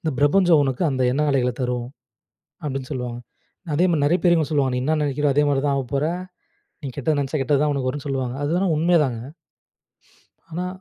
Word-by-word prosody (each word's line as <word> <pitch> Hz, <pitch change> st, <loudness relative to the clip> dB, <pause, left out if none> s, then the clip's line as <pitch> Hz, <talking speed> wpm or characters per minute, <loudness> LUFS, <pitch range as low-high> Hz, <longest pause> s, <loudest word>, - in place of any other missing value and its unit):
இந்த 160 Hz, -, -1 dB
பிரபஞ்சம் 160 Hz, +2 st, +4 dB
உனக்கு 135 Hz, +4 st, -1 dB
அந்த 130 Hz, -1 st, -1 dB
எண்ண 150 Hz, +3 st, 0 dB
அலைகள 125 Hz, -2 st, +2 dB
தரும்.", 125 Hz, -1 st, -2 dB, 0.8 s
அப்டின்னு 135 Hz, -3 st, -4 dB
சொல்வாங்க. 125 Hz, -2 st, -4 dB, 0.6 s
அதே 175 Hz, +5 st, +3 dB
மாரி 155 Hz, -, +1 dB
நெறைய 175 Hz, +5 st, +2 dB
பேர் 170 Hz, -1 st, +5 dB
சொல்லுவாங்க, 135 Hz, -4 st, +1 dB
நீ 125 Hz, -, -1 dB
என்ன 155 Hz, +2 st, +1 dB
நெனைக்கிரியோ? 145 Hz, 0 st, +1 dB
அதே 145 Hz, 0 st, +4 dB
மாரி 135 Hz, -1 st, +1 dB
தான் 140 Hz, -, +2 dB
ஆகப்போற. 135 Hz, +2 st, -1 dB, 0.8 s
நீ 140 Hz, -, -4 dB
கெட்டது 145 Hz, +2 st, 0 dB
நெனச்சா 140 Hz, +2 st, -2 dB
கெட்டது 140 Hz, +1 st, +2 dB
தான் 150 Hz, -1 st, +2 dB
உனக்கு 130 Hz, -2 st, -1 dB
வரும்ன்னு 145 Hz, +2 st, -4 dB
சொல்லுவாங்க. 130 Hz, -2 st, -2 dB
அதுலாம் 175 Hz, +2 st, +1 dB
உண்மைதாங்க. 150 Hz, -8 st, +2 dB, 1.3 s
ஆனா 175 Hz, +3 st, -3 dB
145 Hz, 180 wpm, -22 LUFS, 130-155 Hz, 1.3 s, பேர்